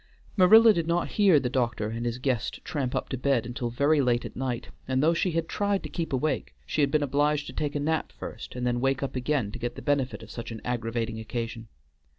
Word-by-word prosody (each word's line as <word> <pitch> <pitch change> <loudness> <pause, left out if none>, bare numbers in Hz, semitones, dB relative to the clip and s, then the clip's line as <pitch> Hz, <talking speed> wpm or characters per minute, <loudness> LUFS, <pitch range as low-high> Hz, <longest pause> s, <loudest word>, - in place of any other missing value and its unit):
Marilla 220 +4 +8
did 170 -4 -1
not 170 +1 +1
hear 195 -7 +5
the 130 - -1
doctor 120 -4 -1
and 115 +2 -3
his 120 0 -2
guest 125 -3 -2
tramp 140 -7 -2
up - - -1
to 130 - -3
bed 130 -3 +1
until 120 0 -3
very 140 +5 +3
late 120 -2 +1
at - - -8
night, 125 -2 -3 0.2
and 130 +1 +1
though 165 +2 +4
she 175 +2 +1
had 165 0 0
tried 200 -1 0
to - - -6
keep 170 -2 -3
awake 135 - -1
she 150 - -1
had 140 - +3
been 150 0 +2
obliged 145 +1 +1
to - - -8
take 150 -1 -2
a - - +1
nap 160 +2 -1
first - - -8
and 125 0 -3
then 120 0 0
wake 135 +1 +1
up 135 -1 -3
again 125 -4 0
to 120 - -7
get 120 0 -3
the - - -7
benefit 140 -5 0
of 110 - -11
such 115 - -6
an 115 -1 -6
aggravating 115 -2 -2
occasion. 115 0 -5
130 Hz, 240 wpm, -27 LUFS, 120-150 Hz, 0.2 s, Marilla